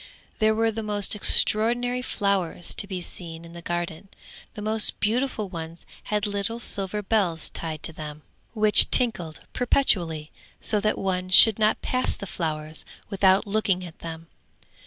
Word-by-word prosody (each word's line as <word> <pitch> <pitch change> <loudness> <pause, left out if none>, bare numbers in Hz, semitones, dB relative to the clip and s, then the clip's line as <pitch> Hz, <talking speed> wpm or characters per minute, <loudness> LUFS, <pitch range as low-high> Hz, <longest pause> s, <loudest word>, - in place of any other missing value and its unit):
There 220 -1 +3
were 225 0 +1
the 225 +1 -5
most 210 -1 -1
extraordinary 240 +4 +3
flowers 195 -7 -1
to 200 - -2
be 185 -2 -5
seen 165 -2 -5
in 170 - -13
the 170 - -10
garden; 175 +2 -5 0.5
the 210 - -7
most 215 0 0
beautiful 225 -1 -1
ones 165 -2 -9 0.2
had 210 0 -1
little 205 +3 -3
silver 205 -2 -1
bells 190 -7 -1
tied 155 -2 -6
to 165 - -5
them, 150 -1 -9 0.3
which 215 -1 +6
tinkled 180 -10 +2
perpetually, 170 - +1 0.3
so 210 - +1
that 215 +1 0
one 185 -1 -2
should 220 +3 +7
not 215 0 +1
pass 255 0 -1
the - - -7
flowers 155 -4 -4 0.3
without 190 0 +3
looking 200 -3 -1
at 170 -2 -13
them. 165 0 -8
195 Hz, 155 wpm, -24 LUFS, 170-215 Hz, 0.5 s, should